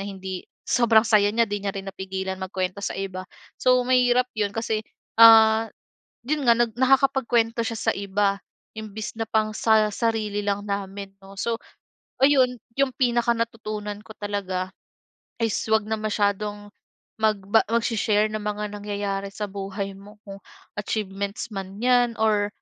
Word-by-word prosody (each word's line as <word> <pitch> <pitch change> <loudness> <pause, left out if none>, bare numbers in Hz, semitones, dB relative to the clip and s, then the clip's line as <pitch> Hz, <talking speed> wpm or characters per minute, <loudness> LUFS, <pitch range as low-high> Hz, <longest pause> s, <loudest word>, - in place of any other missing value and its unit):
hindi 190 -2 -7 0.2
sobrang 230 -2 +4
saya 215 -2 +4
niya 230 +3 +2
hindi 205 -2 -3
niya 200 -1 -2
rin 195 - -5
napigilan 190 0 -5
magkuwento 190 0 -3
sa 200 - -3
iba. 185 -1 -5 0.3
So, 255 -1 +4
mahirap 250 0 +3
'yon 205 -1 -2
kasi, 225 -1 -1 0.4
ah, 225 0 +8 0.6
'yon 290 0 -1
nga, 235 - +8
nag 235 -1 +1
nakakapagkuwento 255 -3 +2
siya 230 -1 -3
sa - - +1
iba, 200 0 0 0.4
imbes 215 0 -6
na 225 - -1
pang 215 -1 +1
sa 220 -1 +4
sarili 215 -2 -1
lang 205 0 -1
namin, 200 -1 -5
'no. 195 0 -14
So, 230 +3 -2 0.6
ayon 265 -3 +4 0.2
'yong 270 -2 +2
pinaka 240 -2 +2
natutunan 215 -3 -4
ko 220 - -13
talaga 190 -3 -3 0.7
is 225 -2 +1 0.2
'wag 220 -1 +3
na 220 0 -1
masyadong 205 -1 -1 0.5
magba 215 0 +3
magse-share 225 -2 +1
ng 215 - -3
mga 210 0 -3
nangyayari 200 -1 -3
sa 210 - -4
buhay 195 0 -5
mo, 200 +2 -14
oh, 195 0 -8 0.4
achievements 200 0 -3
man 195 0 -6
'yan 245 -1 +3
or, 210 -2 +2
210 Hz, 145 wpm, -24 LUFS, 200-230 Hz, 0.7 s, ah